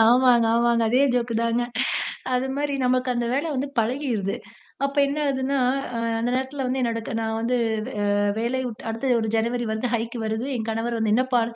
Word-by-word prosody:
ஆமாங்க, 240 0 +5
ஆமாங்க. 235 0 +3
அதே 255 +4 +4
ஜோக்கு 235 -1 0
தாங்க. 230 +1 +1 0.7
அதுமாரி 275 +3 -1
நமக்கு 255 0 +2
அந்த 240 0 -1
வேலை 285 +5 0
வந்து 275 +2 -1
பழகிருது. 230 -4 -1 0.5
அப்ப 280 +1 -3
என்ன 280 +2 -3
ஆகுதுன்னா, 275 0 0 0.4
அ - - -1 0.2
அந்த 235 - 0
நேரத்தில 265 +1 -2
வந்து 260 +1 -1
என்னோட 230 -1 0
க - - -4
நான் 220 0 -1
வந்து 240 +2 +1 0.4
ஆ - - +1 0.3
வேலையை 250 +3 -1
விட்டு 225 -1 -8
அடுத்து 230 +4 -2
ஒரு 220 - -1
ஜனவரி 235 +2 0
வந்தா, 220 +3 -1
ஹைக்கு 230 +1 -3
வருது. 220 +3 -2
என் 225 -1 -3
கணவர் 230 +1 -1
வந்து, 220 -1 +1
என்னப்பா! 250 0 +2
240 Hz, 180 wpm, -24 LUFS, 230-260 Hz, 0.7 s, ஆமாங்க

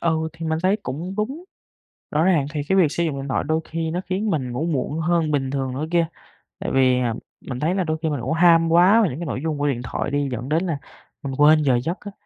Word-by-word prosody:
Ừ, 160 -1 0
thì 165 -1 -6
mình 160 0 0
thấy 190 +3 +3
cũng 165 +9 -5
đúng. 270 +12 -3 0.7
Rõ 155 +2 +2
ràng 170 -7 +3
thì 150 - -1
cái 190 - +2
việc 160 -6 +4
sử 170 - -1
dụng 145 -4 -2
điện 135 - -5
thoại - - 0
đôi 160 +2 0
khi 165 -1 -3
nó 180 +2 -2
khiến 205 +4 0
mình 130 -7 -1
ngủ 140 +7 -2
muộn 155 0 -1
hơn 165 -1 +1
bình 135 -2 0
thường 135 -2 -2
nữa 145 +4 -3
kia. 170 -1 +3 0.5
Tại - - -3
vì, 130 -1 +4
à, 120 -2 0 0.4
mình 125 -1 -4
thấy 165 +5 0
là 190 - +1
đôi 160 -1 -1
khi 160 - 0
mình 145 -5 -2
cũng 130 +7 -1
ham 165 -1 +5
quá 185 +7 +6
về 200 - +2
những 135 +5 -6
cái 175 - -4
nội 130 -4 -3
dung 155 -2 -1
của 145 0 0
điện 125 -4 -1
thoại 140 +3 -3
đi, 145 -1 0
dẫn 125 +3 -4
đến 165 +4 +1
là 160 -5 -1 0.5
mình 135 -1 -4
quên 155 +1 +6
giờ 130 -4 +3
giấc 170 +4 -3
á. 205 - -8
160 Hz, 275 wpm, -22 LUFS, 140-170 Hz, 0.7 s, quá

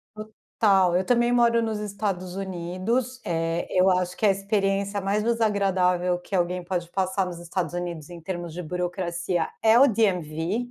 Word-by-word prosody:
Total. 200 -3 +1
Eu 185 - +1
também 240 +1 +2
moro 235 -1 +4
nos 220 -2 -2
Estados 195 -3 -3
Unidos, 195 +7 -2
eh, 165 0 -1
eu 185 +1 +4
acho 180 -1 0
que - - 0
a 205 - +6
experiência 195 0 0
mais 205 +2 0
desagradável 190 -6 +1
que 190 +2 -5
alguém 180 0 0
pode 175 -1 -3
passar 190 +1 0
nos 175 -2 -7
Estados 170 -1 -3
Unidos 175 -3 -5
em 175 - -9
termos 175 -2 -5
de 180 - -5
burocracia 175 0 -2 0.2
é 225 +2 +6
o 280 - +7
DMV. 190 - 0
185 Hz, 160 wpm, -25 LUFS, 175-210 Hz, 0.2 s, o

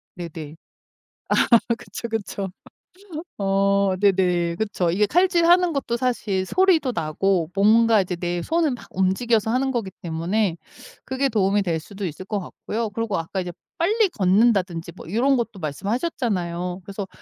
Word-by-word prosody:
네네. 160 -3 -7 1.0
아 235 - +10 0.2
그쵸, 235 - -7
그쵸. 205 -3 -3 0.9
어. 195 -1 +2
네네. 180 -4 +2
그쵸. 195 -3 -1
이게 205 +4 +2
칼질하는 350 - +4
것도 250 -4 -1
사실 215 -7 -1
소리도 355 - +3
나고 170 +2 0
뭔가 220 +1 +5
이제 180 -1 -3
내 175 0 -2
손을 325 - +1
막 245 - -7
움직여서 215 +4 +1
하는 265 +2 +1
거기 230 -6 -2
때문에 170 +3 -1 0.5
그게 270 +1 0
도움이 205 -1 +2
될 165 -4 -1
수도 200 +4 -7
있을 175 +2 -6
것 205 +1 -2
같고요. 220 +4 -4
그리고 225 -1 -2
아까 165 +4 -3
이제 180 -1 -5 0.3
빨리 410 +4 +2
걷는다든지 185 - +2
뭐 165 - -10
요런 255 +5 +3
것도 225 -4 -3
말씀하셨잖아요. 180 - -2
그래서 200 0 -5
200 Hz, 310 characters per minute, -23 LUFS, 180-235 Hz, 1.0 s, 아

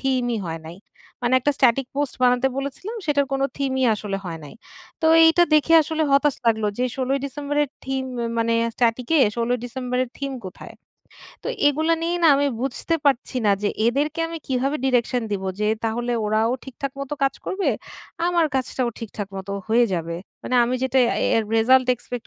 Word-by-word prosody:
থিমই 250 -3 0
হয় 165 -1 -5
নাই। 170 - -9 0.5
মানে 245 +1 +2
একটা 290 +3 +1
স্ট্যাটিক 260 0 +3
পোস্ট 290 -2 -1
বানাতে 250 +1 +4
বলেছিলাম 280 - -5
সেটার 285 -1 +2
কোন 270 0 0
থিমই 265 -2 0
আসলে 205 -2 -4
হয় 165 -2 -5
নাই। 145 - -11 0.5
তো 320 - +3 0.2
এইটা 325 +2 +5
দেখে 315 +2 +4
আসলে 315 +1 -2
হতাশ 280 0 +3
লাগলো 220 -2 +2
যে 250 - +1
১৬ 260 -1 -2
ই - - -1
ডিসেম্বরের 290 +1 -1 0.2
থিম 265 0 -2
ম - - -1 0.2
মানে 230 0 +1 0.2
স্ট্যাটিকে 245 +6 +1 0.2
১৬ 235 0 -1
ই - - 0
ডিসেম্বরের 250 0 -2
থিম 275 0 -3
কোথায়? 185 - -9 0.7
তো - - -4 0.2
এগুলো 315 +3 +1
নিয়ে 345 +1 0
না 330 - +6
আমি 285 - +2 0.2
বুঝতে 275 +5 -1
পারছি 270 -1 +1
না - - +5
যে 205 - +2 0.2
এদেরকে 290 +6 0
আমি 330 0 -5
কিভাবে 270 +3 0
ডিরেকশন 250 -1 +1
দিব 195 -1 -2 0.2
যে 210 - +1 0.2
তাহলে 240 +2 -1
ওরাও 220 +2 +1
ঠিকঠাক 270 +1 -6
মত 275 0 -6
কাজ 275 - +2
করবে। 380 0 -1 0.6
আমার 345 -2 +2
কাজটাও 255 -1 -1
ঠিকঠাক 210 -3 -6
মত 190 +1 -7 0.2
হয়ে 235 +2 +4
যাবে। 170 0 -3 0.3
মানে 255 - -3
আমি 245 +2 -1
যেটা 260 0 +2
এ্যা - - 0 0.2
এর 225 - +2
রেসাল্ট 255 +3 +4
এক্সপেক্ট 245 0 -8
260 Hz, 185 wpm, -23 LUFS, 235-280 Hz, 0.7 s, না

